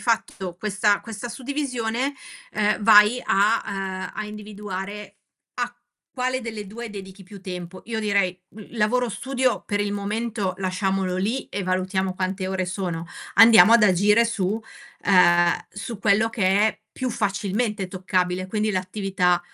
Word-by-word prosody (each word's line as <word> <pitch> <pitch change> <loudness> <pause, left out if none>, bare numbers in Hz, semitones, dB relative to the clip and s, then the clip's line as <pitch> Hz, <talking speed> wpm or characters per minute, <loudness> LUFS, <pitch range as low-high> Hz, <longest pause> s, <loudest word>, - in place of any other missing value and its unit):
fatto 195 -6 -2
questa 210 +1 +1
questa 225 +1 -7
suddivisione, 255 0 -2 0.4
ehm, 210 0 0
vai 215 +3 +6
a 210 +4 +3
uhm, 190 -1 -4
a 215 - -4
individuare 210 -1 -7 0.4
a 245 0 -1 0.4
quale 255 0 -1
delle 220 -4 -6
2 230 +3 -7
dedichi 195 -1 -9
più 195 +1 -12
tempo. 180 -1 -7
Io 220 -1 -3
direi, 200 -4 +1
mhmm, 215 -1 -12
lavoro-studio 250 +3 0
per 205 - -1
il 205 0 -1
momento 205 -1 -2
lasciamolo 190 0 -1
lì, 220 +8 -2
e 200 - -4
valutiamo 185 0 -1
quante 185 0 -2
ore 190 -1 -1
sono, 175 -3 -4 0.3
andiamo 225 +1 +8
ad 230 -2 +6
agire 210 +4 +4
su 205 -5 -1 0.6
uhm, 175 -3 +5 0.2
su 215 +1 -7
quello 215 +2 +3
che 225 -2 -4 0.2
è 220 - -3
più 255 - -3
facilmente 205 -1 -1
toccabile, 185 0 -1
quindi 215 +1 0
l'attività 185 -1 0
205 Hz, 140 wpm, -23 LUFS, 190-225 Hz, 0.6 s, andiamo